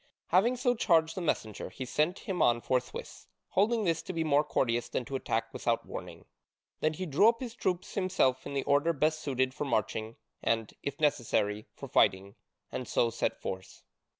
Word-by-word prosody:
Having 220 Hz, +8 st, +4 dB
so 245 Hz, 0 st, +2 dB
charged 165 Hz, -8 st, +3 dB
the 185 Hz, -, -4 dB
messenger 110 Hz, -, -2 dB
he 130 Hz, -, -6 dB
sent 155 Hz, +8 st, +1 dB
him 180 Hz, -4 st, -3 dB
on 120 Hz, 0 st, +4 dB
forthwith, 125 Hz, +1 st, -3 dB, 0.2 s
holding 220 Hz, +3 st, +2 dB
this 165 Hz, -4 st, +1 dB
to -, -, -6 dB
be 165 Hz, -1 st, 0 dB
more 150 Hz, -1 st, +3 dB
courteous 120 Hz, -5 st, 0 dB
than 125 Hz, -, -2 dB
to 135 Hz, -, -5 dB
attack 130 Hz, -, -2 dB
without -, -, 0 dB
warning. -, -, -8 dB, 0.5 s
Then 155 Hz, 0 st, +1 dB
he 185 Hz, +4 st, -4 dB
drew 170 Hz, +8 st, +5 dB
up 230 Hz, 0 st, -1 dB
his 245 Hz, -3 st, -5 dB
troops 185 Hz, -6 st, -2 dB
himself 185 Hz, -10 st, +1 dB
in 140 Hz, -, -5 dB
the 135 Hz, -, 0 dB
order 145 Hz, +4 st, +3 dB
best 155 Hz, +1 st, +1 dB
suited 130 Hz, -3 st, 0 dB
for 145 Hz, -, -3 dB
marching, 110 Hz, -2 st, -1 dB, 0.3 s
and, 115 Hz, -2 st, 0 dB
if 140 Hz, -, -4 dB
necessary, 115 Hz, -8 st, +1 dB
for -, -, -8 dB
fighting, 95 Hz, +1 st, +2 dB, 0.4 s
and 125 Hz, -, -4 dB
so 115 Hz, -, +2 dB
set 115 Hz, -, -1 dB
forth. 95 Hz, 0 st, -6 dB
145 Hz, 185 wpm, -30 LUFS, 120-180 Hz, 0.5 s, drew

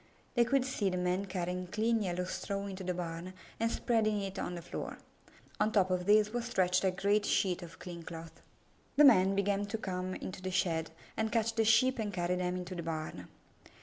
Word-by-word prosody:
They 240 Hz, -1 st, +4 dB
could 260 Hz, +1 st, +2 dB
see 225 Hz, -7 st, 0 dB
the 180 Hz, -, -2 dB
men 180 Hz, +2 st, 0 dB
carrying 180 Hz, -1 st, -3 dB
clean 220 Hz, +4 st, +1 dB
yellow 180 Hz, -2 st, -1 dB
straw 200 Hz, +2 st, -3 dB
into 190 Hz, -1 st, -6 dB
the 180 Hz, -1 st, -2 dB
barn 175 Hz, +1 st, -5 dB, 0.3 s
and 230 Hz, 0 st, +1 dB
spreading 215 Hz, -4 st, +1 dB
it 195 Hz, 0 st, -4 dB
on 175 Hz, -, -3 dB
the 170 Hz, -, -6 dB
floor. -, -, -5 dB, 0.6 s
On 210 Hz, +1 st, +2 dB
top 190 Hz, -4 st, +3 dB
of 180 Hz, 0 st, 0 dB
this 210 Hz, 0 st, +5 dB
was 240 Hz, -1 st, -1 dB
stretched 185 Hz, -7 st, +2 dB
a 190 Hz, -, +4 dB
great 200 Hz, +3 st, +2 dB
sheet 185 Hz, -3 st, +1 dB
of 175 Hz, 0 st, -10 dB
clean 175 Hz, -2 st, -8 dB
cloth. 165 Hz, 0 st, -9 dB, 0.5 s
Then 295 Hz, +1 st, +8 dB
the 270 Hz, -, +10 dB
men 190 Hz, 0 st, +2 dB
began 200 Hz, 0 st, +1 dB
to 220 Hz, +2 st, -2 dB
come 185 Hz, -2 st, -3 dB
into 185 Hz, 0 st, -6 dB
the 185 Hz, -, -3 dB
shed 165 Hz, -3 st, 0 dB, 0.3 s
and 220 Hz, 0 st, -1 dB
catch 230 Hz, 0 st, +1 dB
the 225 Hz, -, +2 dB
Sheep 240 Hz, +4 st, +4 dB
and 210 Hz, -2 st, -1 dB
carry 180 Hz, -1 st, 0 dB
them 180 Hz, 0 st, -1 dB
into 180 Hz, 0 st, -5 dB
the 175 Hz, -, -4 dB
barn. 155 Hz, -, -5 dB
190 Hz, 215 wpm, -32 LUFS, 180-215 Hz, 0.6 s, the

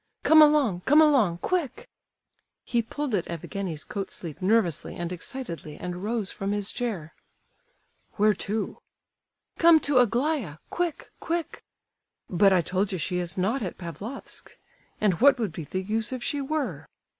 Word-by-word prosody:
Come 315 Hz, 0 st, +7 dB
along, 290 Hz, -12 st, +4 dB
come 295 Hz, +3 st, +6 dB
along—quick!" 300 Hz, -, +2 dB, 0.8 s
He 235 Hz, -, +1 dB
pulled 275 Hz, +3 st, -4 dB
at 190 Hz, -5 st, 0 dB
Evgenie's 170 Hz, -1 st, -4 dB
coat 195 Hz, -2 st, -5 dB
sleeve 165 Hz, -2 st, -8 dB
nervously 185 Hz, -5 st, +1 dB
and 175 Hz, 0 st, -4 dB
excitedly, 170 Hz, -, -6 dB
and 180 Hz, +1 st, -6 dB
rose 215 Hz, -2 st, -1 dB
from 195 Hz, +1 st, -3 dB
his 205 Hz, -1 st, -1 dB
chair. 200 Hz, -11 st, -4 dB, 1.0 s
"Where 210 Hz, 0 st, +3 dB
to?" 210 Hz, +2 st, -3 dB, 0.8 s
"Come 335 Hz, -1 st, +7 dB
to 280 Hz, -3 st, +3 dB
Aglaya—quick, 250 Hz, -, -1 dB
quick!" 340 Hz, -1 st, -3 dB, 0.6 s
"But 195 Hz, +2 st, +4 dB
I 185 Hz, -2 st, +4 dB
told 190 Hz, +4 st, -1 dB
you 185 Hz, -, -2 dB
she 180 Hz, +2 st, -1 dB
is 175 Hz, 0 st, -3 dB
not 215 Hz, +9 st, 0 dB
at 185 Hz, -5 st, -4 dB
Pavlofsk. 195 Hz, +9 st, -7 dB, 0.4 s
And 205 Hz, -2 st, +1 dB
what 280 Hz, +1 st, +7 dB
would 220 Hz, -6 st, -2 dB
be 155 Hz, 0 st, -7 dB
the 185 Hz, +5 st, -3 dB
use 220 Hz, +4 st, -1 dB
if 255 Hz, -2 st, -4 dB
she 290 Hz, -, -1 dB
were?" 300 Hz, +1 st, -3 dB
210 Hz, 145 wpm, -26 LUFS, 180-270 Hz, 1.0 s, Come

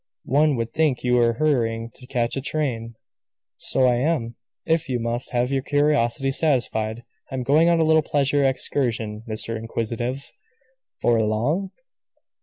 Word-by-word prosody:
"One 150 Hz, 0 st, +3 dB
would 115 Hz, -1 st, -3 dB
think 155 Hz, -6 st, +1 dB
you 125 Hz, -1 st, +1 dB
were 120 Hz, -1 st, +4 dB
hurrying 115 Hz, -5 st, 0 dB
to 125 Hz, -, -14 dB
catch 120 Hz, -3 st, -1 dB
a 135 Hz, -, -2 dB
train." 125 Hz, -6 st, -3 dB, 0.6 s
"So -, -, -1 dB
I 125 Hz, -1 st, +3 dB
am 125 Hz, -4 st, -1 dB, 0.3 s
if 160 Hz, -3 st, 0 dB
you 125 Hz, -2 st, 0 dB
must 120 Hz, +2 st, -2 dB
have 125 Hz, +1 st, 0 dB
your 135 Hz, -1 st, +1 dB
curiosity 140 Hz, -2 st, +1 dB
satisfied. 120 Hz, -6 st, 0 dB, 0.3 s
I -, -, -3 dB
am 130 Hz, -, -2 dB
going 155 Hz, +6 st, +4 dB
on 170 Hz, -1 st, +3 dB
a -, -, +4 dB
little 160 Hz, 0 st, +4 dB
pleasure 145 Hz, -1 st, +1 dB
excursion, 115 Hz, -5 st, -1 dB
Mr. 110 Hz, +1 st, -3 dB
Inquisitive." 115 Hz, +4 st, -4 dB, 0.7 s
"For 115 Hz, -1 st, +3 dB
long?" 125 Hz, -, 0 dB
125 Hz, 155 wpm, -23 LUFS, 115-145 Hz, 0.7 s, were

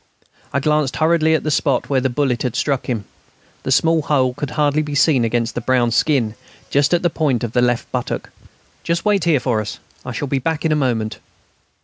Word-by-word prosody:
I 140 Hz, -, +1 dB
glanced 150 Hz, -1 st, +1 dB
hurriedly 160 Hz, 0 st, +3 dB
at -, -, -1 dB
the 155 Hz, -, -1 dB
spot 140 Hz, -2 st, +1 dB
where 135 Hz, -2 st, +1 dB
the 130 Hz, -, +1 dB
bullet 130 Hz, -1 st, 0 dB
had 125 Hz, -3 st, -2 dB
struck 140 Hz, -3 st, -1 dB
him. 110 Hz, -6 st, -2 dB, 0.6 s
The -, -, -3 dB
small 165 Hz, 0 st, +3 dB
hole 130 Hz, -4 st, +1 dB
could 145 Hz, +1 st, -4 dB
hardly 150 Hz, 0 st, +1 dB
be 150 Hz, -1 st, -4 dB
seen 135 Hz, -2 st, +4 dB
against 115 Hz, 0 st, 0 dB
the 120 Hz, -, -3 dB
brown 120 Hz, -1 st, +2 dB
skin, 120 Hz, -2 st, +1 dB, 0.4 s
just 140 Hz, +2 st, +2 dB
at 175 Hz, 0 st, +2 dB
the 175 Hz, -, +3 dB
point 140 Hz, -8 st, 0 dB
of 120 Hz, -, -2 dB
the 125 Hz, -, +2 dB
left 120 Hz, -1 st, 0 dB
buttock. -, -, -3 dB, 0.5 s
"Just 170 Hz, +3 st, -2 dB
wait 200 Hz, -5 st, +2 dB
here 160 Hz, -5 st, +3 dB
for 120 Hz, -4 st, 0 dB
us; 105 Hz, -, -6 dB, 0.3 s
I 125 Hz, -, -6 dB
shall 130 Hz, +5 st, -3 dB
be 135 Hz, 0 st, 0 dB
back 160 Hz, +3 st, -2 dB
in 160 Hz, -, +2 dB
a -, -, +3 dB
moment." 120 Hz, -7 st, -1 dB
140 Hz, 220 wpm, -19 LUFS, 125-155 Hz, 0.6 s, seen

